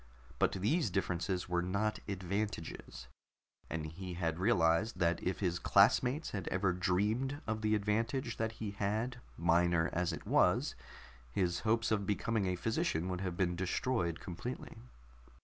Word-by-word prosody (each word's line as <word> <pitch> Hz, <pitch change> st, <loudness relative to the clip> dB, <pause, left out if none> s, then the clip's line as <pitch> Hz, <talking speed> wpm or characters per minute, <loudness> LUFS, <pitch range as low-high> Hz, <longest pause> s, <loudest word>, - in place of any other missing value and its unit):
But -, -, +3 dB
these 110 Hz, -, +1 dB
differences 90 Hz, 0 st, -1 dB
were 90 Hz, -1 st, +1 dB
not 100 Hz, +4 st, 0 dB
advantages, 95 Hz, -, -4 dB, 0.6 s
and 80 Hz, -2 st, -3 dB
he 90 Hz, +3 st, -6 dB
had 85 Hz, -1 st, -1 dB
realized 95 Hz, 0 st, +3 dB
that 85 Hz, -1 st, +1 dB
if 95 Hz, +2 st, -2 dB
his 90 Hz, -3 st, 0 dB
classmates 125 Hz, +8 st, +4 dB
had 95 Hz, -4 st, -4 dB
ever 95 Hz, 0 st, +1 dB
dreamed 105 Hz, +10 st, 0 dB
of 110 Hz, 0 st, -2 dB
the 110 Hz, 0 st, +2 dB
advantage 115 Hz, +4 st, 0 dB
that 110 Hz, 0 st, -1 dB
he 110 Hz, -2 st, -5 dB
had, 105 Hz, +5 st, -1 dB, 0.2 s
minor 85 Hz, 0 st, +3 dB
as 90 Hz, +1 st, +1 dB
it 80 Hz, -, -6 dB
was, -, -, +3 dB, 0.6 s
his 85 Hz, +5 st, 0 dB
hopes 115 Hz, +1 st, +1 dB
of 100 Hz, -3 st, +1 dB
becoming 105 Hz, 0 st, 0 dB
a 90 Hz, -, 0 dB
physician 110 Hz, -, 0 dB
would 90 Hz, 0 st, -3 dB
have 90 Hz, -2 st, -3 dB
been 90 Hz, -2 st, +1 dB
destroyed 90 Hz, -1 st, -1 dB
completely. 95 Hz, +8 st, -6 dB
95 Hz, 150 wpm, -34 LUFS, 90-110 Hz, 0.6 s, classmates